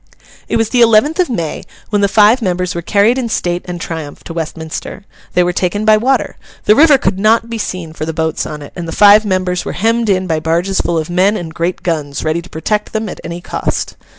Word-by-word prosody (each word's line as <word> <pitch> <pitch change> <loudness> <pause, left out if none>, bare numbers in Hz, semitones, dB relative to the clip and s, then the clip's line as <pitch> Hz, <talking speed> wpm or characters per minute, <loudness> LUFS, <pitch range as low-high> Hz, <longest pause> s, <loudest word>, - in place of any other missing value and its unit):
It - - 0
was 225 -1 0
the 245 - +2
eleventh 235 - +4
of 360 - +2
May, 170 -10 -3 0.3
when 205 -1 +2
the 200 - +4
five 215 +5 +4
members 180 -3 -1
were 170 - -4
carried 210 +8 +2
in 240 -3 -2
state 175 -4 -1
and 180 -1 -6
triumph 160 -3 -6
to 165 - -8
Westminster. 160 +4 -6 0.3
They 180 - +4
were 175 0 0
taken 195 +4 -1
by 215 -1 +6
water. 250 +1 0 0.3
The 210 - +5
river 300 0 +6
could 190 -5 -1
not 225 +2 +2
be 230 - -3
seen 175 -6 -5
for 155 - -6
the 160 - -2
boats 160 -1 -2
on 150 -1 -7
it; - - -12
and 175 -2 -5
the - - -4
five 210 +1 +6
members 185 -2 -1
were - - -5
hemmed 225 +3 0
in 185 -1 +1
by 160 -3 0
barges 170 +5 0
full 170 - -1
of 160 +1 -3
men 190 +4 +2
and 165 -2 -7
great 170 +2 -2
guns, 150 -5 -2
ready 155 +2 -1
to 180 - -15
protect 210 +6 -2
them, 220 -1 -2
at - - -8
any 170 +1 -6
cost. - - -3
185 Hz, 235 wpm, -15 LUFS, 170-215 Hz, 0.3 s, by